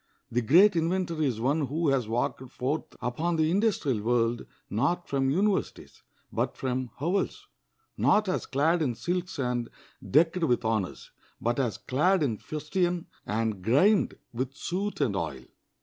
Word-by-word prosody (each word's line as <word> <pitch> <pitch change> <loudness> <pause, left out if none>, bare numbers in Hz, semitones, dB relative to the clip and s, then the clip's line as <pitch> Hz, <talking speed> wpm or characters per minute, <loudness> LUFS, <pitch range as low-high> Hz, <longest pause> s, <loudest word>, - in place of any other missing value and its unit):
The 120 - +1
great 175 - +6
inventor 170 0 0
is 130 -7 0
one 140 +4 +1
who 155 +3 0
has 130 -5 +1
walked 120 +3 -1
forth 135 +7 -3
upon 155 +9 -1
the 160 0 +2
industrial 180 - +1
world, 120 +1 +1 0.2
not 170 - 0
from 135 -1 +1
universities, 195 +7 -1 0.3
but - - -1
from 130 -1 -2
hovels; 195 - -1 0.5
not 210 -1 +3
as 185 - -1
clad 160 +5 +2
in 125 -6 0
silks 180 +6 -3
and 125 -3 -1 0.4
decked 165 +4 +3
with 120 -6 +1
honors, 110 -4 -2 0.3
but 120 +3 0
as 120 -7 0
clad 175 +7 +2
in 115 -7 -1
fustian 175 +3 -2 0.2
and 110 -1 -1
grimed 165 - +3 0.2
with 130 +3 -3
soot 195 +7 -3
and 105 -6 +1
oil. 75 -8 -3
140 Hz, 150 wpm, -28 LUFS, 120-175 Hz, 0.5 s, great